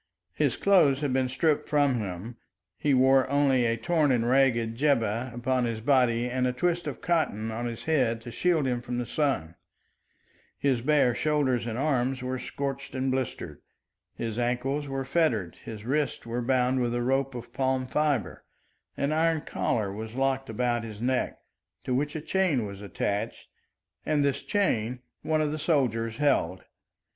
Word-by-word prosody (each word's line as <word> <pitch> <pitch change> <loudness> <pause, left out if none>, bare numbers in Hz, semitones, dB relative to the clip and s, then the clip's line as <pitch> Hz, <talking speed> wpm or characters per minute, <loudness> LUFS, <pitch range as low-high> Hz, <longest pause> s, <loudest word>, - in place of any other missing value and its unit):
His - - 0
clothes 155 -9 +4
had 140 -3 0
been 130 -1 +1
stripped 150 +3 +1
from 145 -4 +3
him; 105 +4 -6 0.4
he 150 - 0
wore 130 0 +4
only 135 -3 +3
a 115 0 0
torn 150 +4 +2
and 120 -2 +1
ragged 120 -3 +2
jibbeh 120 -3 +1
upon 125 +1 0
his 115 -2 -2
body 125 -1 +2
and 125 +1 0
a - - +1
twist 175 +6 0
of - - -5
cotton 135 - 0
on 120 +2 -3
his 115 -1 -6
head 130 -8 +1
to 120 +1 -8
shield 165 +1 +1
him 125 -2 -1
from 120 0 -4
the 125 - -2
sun. 125 - -1 1.0
His 130 -4 +1
bare 135 -2 +3
shoulders 135 -4 +1
and 115 0 -3
arms 130 -2 0
were 130 0 -2
scorched 140 0 -5
and 130 0 0
blistered. 130 -2 -3 0.5
His 115 0 -4
ankles 130 +4 -1
were 135 -1 -3
fettered, 125 - 0
his 110 -1 -8
wrists 150 +2 -1
were 120 +1 -3
bound 130 +1 +2
with 120 -1 0
a 120 - 0
rope 135 +1 0
of 120 0 -8
palm 130 -1 0
fibre, 145 -2 -1 0.5
an 140 +1 0
iron 160 0 +2
collar 105 -9 -1
was 110 +2 -7
locked 135 0 0
about 120 +1 0
his 110 -2 -8
neck, 125 +2 0 0.5
to 125 - -2
which 145 +4 -1
a 155 - -3
chain 160 - +1
was 100 -1 -8
attached, 100 +1 -3 0.5
and 150 -2 +1
this 140 -2 0
chain 125 - 0 0.2
one 155 -1 +1
of 150 -1 0
the 155 - -3
soldiers 115 -8 0
held. 130 - +1
130 Hz, 170 wpm, -27 LUFS, 115-145 Hz, 1.0 s, clothes